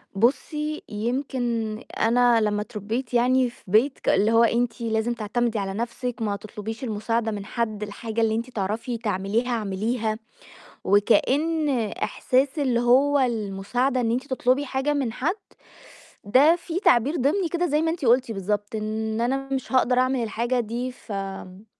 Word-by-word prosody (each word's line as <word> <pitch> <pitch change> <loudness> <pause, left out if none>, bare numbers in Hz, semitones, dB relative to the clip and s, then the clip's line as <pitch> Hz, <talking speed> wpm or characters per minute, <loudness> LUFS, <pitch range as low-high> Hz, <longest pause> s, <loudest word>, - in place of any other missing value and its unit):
بُصّي، 300 +7 0
يمكن 235 -1 -2 0.2
أنا 240 0 +4
لمّا 210 -1 0
اتربيت 220 +4 -4
يعني 250 +1 +3
في 235 - -19
بيت 225 +9 +3
ك - - -1
اللي 215 +2 +3
هو 230 +1 +5
أنتِ 235 +1 +1
لازم 225 +1 0
تعتمدي 235 0 -1
على 195 -1 -3
نَفْسِك، 235 +2 -4
ما 210 -2 0
تطلبيش 215 +3 -7
المساعدة 225 0 -1
من 205 -2 -5
حد، 215 -2 -3
الحاجة 220 +2 -4
اللي 220 -1 +2
أنتِ 230 +3 -3
تعرفي 230 +2 -3
تعمليها 215 +2 -1
اعمليها، 220 0 -1 0.7
وكأن 290 +10 +2 0.3
إحساس 265 +4 +1
اللي 255 -5 +1
هو 270 +4 +4
المساعدة 240 +2 0
إن 230 -2 0
أنتِ 255 +4 -1
تطلبي 260 +1 +1
حاجة 265 +3 -1
من 265 -6 -1
حد، 305 - -1 0.9
ده 275 +11 +5
في 345 0 -4
تعبير 265 - +3
ضمني 335 +7 +1
كده 345 +1 0
زي 300 -1 +1
ما 325 - +1
أنتِ 325 -3 -4
قُلتِ 245 0 +3
بالضبط، 205 +1 -3
إن 220 +1 -2
أنا 270 +3 -1
مش 265 0 -3
هاقدر 255 -1 +3
أعمل 255 0 +2
الحاجة، 235 +3 -1
دي 240 +3 -3
فآمم 195 -3 -7
235 Hz, 155 wpm, -24 LUFS, 215-260 Hz, 0.9 s, هو